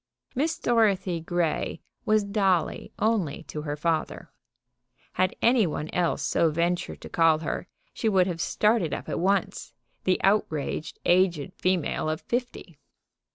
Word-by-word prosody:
Miss 310 +6 0
Dorothy 200 -7 +2
Grey 170 -1 -1 0.3
was 215 -1 +3
Dolly 195 -5 0
only 210 -10 0
to 150 - -6
her 145 -1 -3
father. 160 +1 -2 0.8
Had 185 0 +1
any 235 -4 +4
one 155 0 -4
else 175 -2 0
so 165 - +2
ventured 170 +3 -1
to - - -8
call 165 -2 +4
her 155 - -4 0.3
she 225 - 0
would 190 -3 +4
have 170 -2 -3
started 210 -6 +1
up - - -8
at - - -2
once, 195 +2 0 0.3
the 185 - +2
outraged 160 -7 0
aged 175 -5 +2
female 180 -4 0
of 155 +1 -2
fifty. 240 - -4
180 Hz, 140 wpm, -26 LUFS, 160-210 Hz, 0.8 s, any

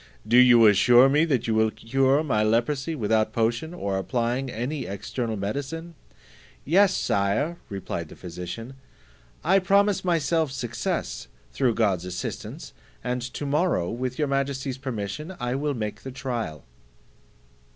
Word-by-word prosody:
Do 120 +3 +4
you 120 -2 +7
assure 120 +5 +6
me 150 +4 +4
that 130 -7 0
you 115 - 0
will 110 0 +3
cure 135 +6 +1
my 120 -8 +1
leprosy 125 +8 +1
without 110 -3 +1
potion, 115 +8 0
or 100 - -2
applying 125 +5 -1
any 125 +5 -3
external 110 +3 -4
medicine?" 140 +11 -4 0.7
"Yes, 190 +5 +4
Sire," 100 +13 0
replied 90 -5 -5
the - - -11
physician, 90 +8 -7 0.7
"I 190 +4 +4
promise 200 +1 +2
myself 165 -3 +1
success, 120 - -3 0.3
through 125 -5 +1
God's 95 -6 +1
assistance, 90 0 -6 0.3
and 125 0 -2
to 130 +4 -5
morrow, 145 - +1
with 125 +1 -3
your 150 - +1
majesty's 135 -1 -2
permission, 130 - -5
I 125 0 -2
will 145 +1 -1
make 105 -3 -4
the 135 - -7
trial." 120 - -4
125 Hz, 140 wpm, -25 LUFS, 110-145 Hz, 0.7 s, you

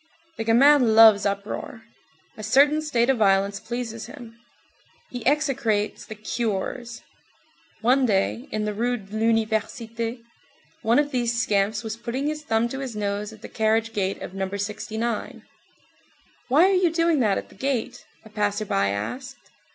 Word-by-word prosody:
19 - - -40
The 225 - -2 0.2
gamin 270 -7 +5
loves 220 -3 +7
uproar. 200 +3 -5 0.5
A - - -9
certain 280 +8 +4
state 245 -6 +1
of 265 - -1
violence 195 -1 +2
pleases 230 -1 -5
him. 240 -5 -11 0.8
He 245 -2 -6
execrates 255 -8 0
"the 215 - -7
curés." 230 +2 -3 0.8
One 255 +3 +3
day, 215 +5 0
in 215 0 -2
the 210 - -2
Rue 240 +4 0
de 200 -1 -11
l'Université, 225 +1 -1 0.6
one 230 +1 +3
of 290 0 +2
these 240 -2 0
scamps 215 0 +1
was 220 0 -5
putting 240 +4 -4
his 305 0 -2
thumb 225 -5 +1
to 270 - -5
his 260 -5 -5
nose 205 0 -3
at 220 0 -15
the - - -6
carriage 225 +1 0
gate 195 -2 -1
of - - -7
No. 190 0 -3
69. 215 +3 -4 1.0
"Why 285 +6 +5
are 390 - +2
you 365 -2 +3
doing 330 -2 +2
that 210 -5 +2
at - - -6
the - - -17
gate?" 245 +1 -3 0.2
a - - -12
passer 210 0 -1
by 100 - +1
asked. 255 - -6
225 Hz, 160 wpm, -24 LUFS, 210-250 Hz, 1.0 s, loves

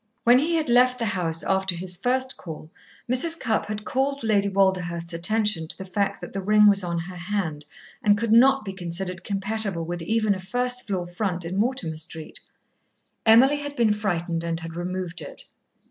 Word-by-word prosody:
When 240 +2 +6
he 330 +4 0
had 315 -2 0
left 250 +1 +4
the 235 - -2
house 170 -6 0
after 190 -1 +1
his 180 +1 -1
first 255 +6 0
call, 160 -2 -10 0.4
Mrs. 320 +7 +4
Cupp 225 -4 -1
had 210 0 -5
called 275 0 -1
Lady 205 -2 +2
Walderhurst's 180 -3 0
attention 200 0 +3
to - - -9
the 190 - -8
fact 200 +1 -2
that - - -9
the 195 - -3
ring 210 +2 +4
was 200 -2 +4
on 170 -1 -2
her 175 +2 -6
hand, 175 -5 -3 0.4
and 205 -2 +4
could 230 +1 -2
not 265 +2 +5
be 195 - -5
considered 180 0 -5
compatible 200 -3 -3
with 175 +1 -5
even 215 +3 +1
a 190 - -6
first 245 +6 -2
floor 185 -4 -2
front 175 -1 -3
in 175 +3 -4
Mortimer 205 -7 -1
Street. 160 0 -7 0.9
Emily 260 +6 +6
had 290 0 -6
been 230 -4 +2
frightened 175 -5 -2
and 165 0 -3
had 165 0 -8
removed 175 -1 -4
it. 145 - -9
195 Hz, 190 wpm, -24 LUFS, 175-230 Hz, 0.9 s, When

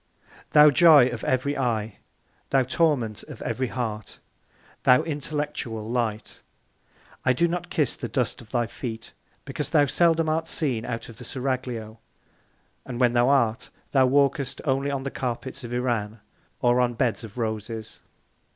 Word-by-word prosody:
Thou 150 0 +8
Joy 145 -3 +7
of 120 -3 -6
ev'ry 130 +3 0
Eye! 110 -5 -1 0.5
Thou 135 -1 +3
Torment 125 -6 0
of - - -11
every 130 0 -2
Heart! 110 -4 -5 0.6
Thou 125 0 +5
Intellectual 145 -7 -4
Light! 115 -3 -3 0.8
I 130 - +3
do 170 +7 +2
not 175 +1 -4
kiss 150 -5 0
the - - -5
Dust 125 -2 -2
of 110 - -16
thy 120 -2 0
Feet; 115 -1 -7 0.3
because - - -4
thou 145 - +4
seldom 165 +2 +2
art 160 +1 0
seen 130 -10 -1
out 115 -2 -4
of 115 - -12
the 125 - -10
Seraglio, 125 -4 -4 0.8
and 125 -2 -6
when 120 -2 +3
thou 120 +1 +3
art, 120 -4 +2 0.2
thou 130 -2 +4
walkest 140 0 +1
only 135 0 +1
on 140 -1 -2
the 135 - -4
Carpets 125 +1 -4
of 120 - -7
Iran, 115 -3 -2 0.4
or 120 0 +3
on 120 -1 0
Beds 120 -1 0
of 110 0 -10
Roses. 110 -1 -4
125 Hz, 155 wpm, -25 LUFS, 115-140 Hz, 0.8 s, Thou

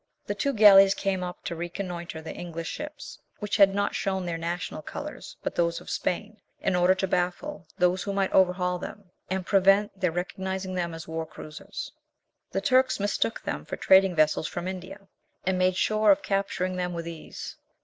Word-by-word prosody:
The - - -2
two 280 - 0
galleys 195 -3 +8
came 190 -2 -1
up 180 0 -6
to 170 - -4
reconnoitre 175 -1 -5
the 160 - -6
English 165 -1 -6
ships, 300 0 -7 0.2
which 210 -1 -2
had 195 -1 +6
not 200 0 0
shown 190 -2 -1
their 170 -1 -2
national 170 +2 -3
colours - - -8
but - - -2
those 170 -1 +1
of - - -9
Spain, 210 +4 -2 0.2
in 190 - 0
order 180 +1 +4
to 190 0 -1
baffle 180 - -2
those 180 +1 +2
who 200 - -3
might 195 -1 0
overhaul 180 -1 +3
them, 200 -1 -9 0.2
and 190 -1 -2
prevent 195 +2 +4
their 180 -3 +2
recognising 190 +2 -3
them 170 -2 -2
as 165 +1 -8
war 160 0 -4
cruisers. 155 0 -8 0.6
The 195 - -2
Turks 255 +4 +3
mistook 205 +2 -1
them - - -3
for - - -5
trading 190 -1 +5
vessels 155 0 +3
from 175 +1 -4
India, 190 +2 -7 0.4
and 185 0 +1
made 185 0 +3
sure 215 +2 +2
of 295 0 +5
capturing 190 -2 -1
them 180 -1 -2
with 170 -1 -5
ease. 165 -2 -8
185 Hz, 185 wpm, -27 LUFS, 175-195 Hz, 0.6 s, galleys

